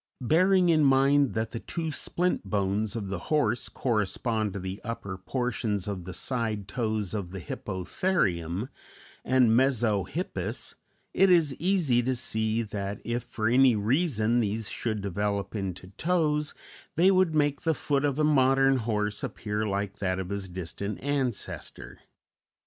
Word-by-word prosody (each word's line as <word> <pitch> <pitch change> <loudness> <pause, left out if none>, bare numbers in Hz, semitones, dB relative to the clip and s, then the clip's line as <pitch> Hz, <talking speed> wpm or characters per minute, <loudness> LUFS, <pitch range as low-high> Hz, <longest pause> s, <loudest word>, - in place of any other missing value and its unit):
Bearing 180 +7 +4
in 155 -2 +4
mind 135 -1 +4
that 110 0 -1
the 115 - -4
two 160 +4 -4
splint 180 +4 0
bones 100 +1 -1
of 100 -4 -4
the 100 - -3
horse 125 -7 +1
correspond 110 -2 -1
to 100 - -4
the 95 +2 -6
upper 100 -5 -5
portions 110 -1 -2
of 95 -4 -4
the 95 - -6
side 110 -6 -2
toes 110 -4 -2
of 100 -5 -3
the 95 +1 -6
Hippotherium 95 - -1 0.5
and 130 -3 +4
Mesohippus, 120 -7 0 0.4
it 195 +1 +4
is 165 -6 +4
easy 170 -9 +2
to 130 +2 0
see 110 -1 0
that 100 -2 -4
if 120 +1 -1
for 110 -1 -3
any 125 +1 +5
reason 115 - +1
these 110 -1 -1
should 110 -3 -2
develop 100 +1 -2
into 95 -2 -4
toes, 155 -4 +1 0.4
they 185 +4 +5
would 185 -4 +3
make 145 -2 +2
the 160 -2 +1
foot 140 0 0
of 145 -2 0
a 155 - +2
modern 135 -2 +4
horse 105 -3 -1
appear 105 0 -3
like 100 0 -3
that 95 -2 0
of 95 -1 -4
his 100 -1 -3
distant 95 +3 -5
ancestor. 135 -5 -3
115 Hz, 150 wpm, -28 LUFS, 100-140 Hz, 0.5 s, any